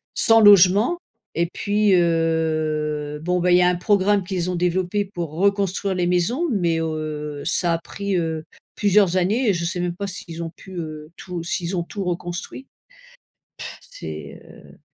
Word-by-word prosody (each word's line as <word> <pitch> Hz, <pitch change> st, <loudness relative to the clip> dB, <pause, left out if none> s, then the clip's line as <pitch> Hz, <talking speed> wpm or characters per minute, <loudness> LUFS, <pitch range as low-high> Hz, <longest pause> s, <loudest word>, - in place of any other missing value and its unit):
sans 225 Hz, 0 st, +5 dB
logement 205 Hz, -, +6 dB, 0.4 s
et 170 Hz, -, +2 dB
puis, 205 Hz, 0 st, +1 dB
heu, 155 Hz, -3 st, 0 dB
bon 180 Hz, +1 st, +1 dB
bah, 180 Hz, +1 st, +2 dB
il 175 Hz, -, +7 dB
y -, -, +4 dB
a -, -, +4 dB
un 180 Hz, -, +1 dB
programme 200 Hz, +2 st, +2 dB
qu'ils 180 Hz, -1 st, -2 dB
ont -, -, -2 dB
développé 180 Hz, +3 st, 0 dB
pour 175 Hz, -5 st, -6 dB
reconstruire 195 Hz, +2 st, 0 dB
les 180 Hz, -1 st, 0 dB
maisons 180 Hz, -, +1 dB
mais 175 Hz, -6 st, +1 dB
heu, 155 Hz, -2 st, -4 dB
ça 175 Hz, -1 st, +1 dB
a 165 Hz, -, -1 dB
pris, 200 Hz, +2 st, -3 dB
heu, 160 Hz, -2 st, -2 dB, 0.3 s
plusieurs 200 Hz, -3 st, +3 dB
années 210 Hz, +6 st, +1 dB
et -, -, +4 dB
je 170 Hz, 0 st, -2 dB
sais 175 Hz, +1 st, -2 dB
même 175 Hz, -1 st, -2 dB
pas 200 Hz, +2 st, -4 dB
s'ils 170 Hz, -3 st, -7 dB
ont 165 Hz, -, -6 dB
pu, 190 Hz, -, -13 dB
heu, 155 Hz, -2 st, -6 dB
tout 180 Hz, -2 st, -6 dB
s'ils 175 Hz, +1 st, -2 dB
ont 170 Hz, -, 0 dB
tout 195 Hz, +3 st, -6 dB
reconstruit. 175 Hz, +8 st, -5 dB, 0.9 s
Pff, -, -, -7 dB
c'est, -, -, -9 dB
heu -, -, -16 dB
180 Hz, 175 wpm, -22 LUFS, 165-200 Hz, 0.9 s, il